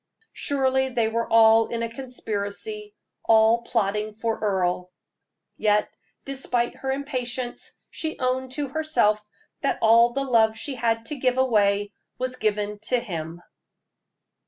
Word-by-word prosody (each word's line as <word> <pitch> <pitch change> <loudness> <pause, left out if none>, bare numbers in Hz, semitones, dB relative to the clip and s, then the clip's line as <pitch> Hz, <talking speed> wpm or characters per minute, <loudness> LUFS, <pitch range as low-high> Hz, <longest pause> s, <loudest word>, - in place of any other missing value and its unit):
Surely 265 -1 0
they 235 -3 +1
were 230 +1 -2
all 225 0 +6
in 230 0 -3
a - - 0
conspiracy, 250 - -5 0.3
all 225 +1 +5
plotting 215 -2 -1
for 225 0 -2
Earle. 180 -3 -1 0.7
Yet, 210 0 +1 0.3
despite 250 -3 -1
her 265 - -3
impatience, 255 -3 -4 0.2
she 315 0 -4
owned 255 0 -1
to 285 -1 -3
herself 275 -9 +1 0.4
that 275 - 0
all 230 +2 +6
the 275 +1 -1
love 225 -4 +3
she 285 - -4
had 230 -2 -1
to 300 - -5
give 255 0 +1
away 205 -5 +2 0.3
was 255 0 -3
given 210 -1 -1
to 250 +1 +1
him. 170 -6 -6
230 Hz, 135 wpm, -25 LUFS, 215-260 Hz, 0.7 s, all